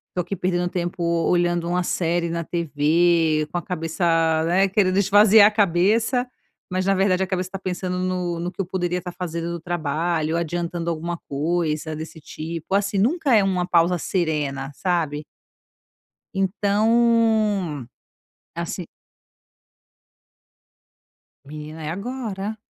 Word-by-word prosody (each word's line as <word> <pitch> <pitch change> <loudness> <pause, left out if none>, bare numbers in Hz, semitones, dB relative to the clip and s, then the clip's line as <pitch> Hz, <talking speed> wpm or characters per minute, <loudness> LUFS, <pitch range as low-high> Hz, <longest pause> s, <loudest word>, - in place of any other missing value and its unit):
tô 180 - +1
aqui 180 +3 -4
perdendo 180 0 0
tempo 175 0 -3 0.3
olhando 175 -1 +1
uma 180 +1 0
série 170 -1 0
na 170 0 -2
TV", 160 0 +2
com 175 - -2
a - - -1
cabeça, 165 +1 -3 0.4
né, 190 +3 +3
querendo 190 -1 +2
esvaziar 205 +1 +6
a - - +1
cabeça, 210 +6 +2 0.5
mas 185 0 -1
na 195 - +3
verdade, 190 -1 +2
a - - -3
cabeça 185 -1 -2
tá 195 - -5
pensando 180 -1 -3
no 180 -2 -2
no 175 +1 -3
que - - -3
eu - - -3
poderia 180 -1 -2
estar 180 0 -7
fazendo 170 -1 -4
do 170 - -4
trabalho, 165 -1 -1
adiantando 170 0 -2
alguma 170 +1 -3
coisa 155 +1 -1
desse 160 0 -8
tipo, 165 +4 -6
assim, 200 0 +1
nunca 270 - +2
é 205 - +5
uma 180 -2 0
pausa 175 0 +3
serena, 150 -6 -2
sabe? 155 -5 -1 1.1
Então, 210 - +2 0.7
assim 170 +1 -4 2.6
Menina 155 +2 -8
é 150 - -3
agora. 215 +1 -4
175 Hz, 130 wpm, -23 LUFS, 165-195 Hz, 2.6 s, esvaziar